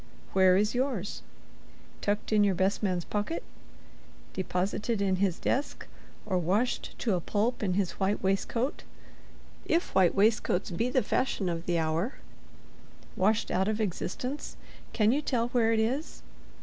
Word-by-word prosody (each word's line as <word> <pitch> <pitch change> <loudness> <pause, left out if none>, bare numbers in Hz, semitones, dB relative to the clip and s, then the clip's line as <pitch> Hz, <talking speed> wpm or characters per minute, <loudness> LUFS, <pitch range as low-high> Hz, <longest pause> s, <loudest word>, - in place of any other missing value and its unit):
Where 185 -1 +5
is 210 +2 +2
yours? 245 -6 -2 0.8
Tucked 210 +1 -1
in 210 -1 +5
your 200 -2 +3
best 190 +3 +1
man's 185 -4 0
pocket; 210 +11 -2 0.9
deposited 195 +4 -1
in 190 -2 +1
his 190 -2 +1
desk—or 215 -7 -3
washed 200 +9 0
to 225 - 0
a 180 - 0
pulp 220 +7 0
in 185 -4 0
his 195 -2 +1
white 195 +1 +1
waistcoat 230 +7 0 0.8
(if 335 - 0
white 185 -3 +4
waistcoats 200 -3 +2
be 230 +8 0
the 255 0 +2
fashion 205 -7 0
of 165 0 -4
the 175 -1 +2
hour), 165 +9 0 1.0
washed 210 +4 +1
out 190 +2 +1
of 215 0 0
existence—can 220 - -2
you 285 +4 +1
tell 240 -5 0
where 235 -2 +2
it 225 - +2
is? 255 +8 -2
205 Hz, 140 wpm, -29 LUFS, 185-235 Hz, 1.0 s, Where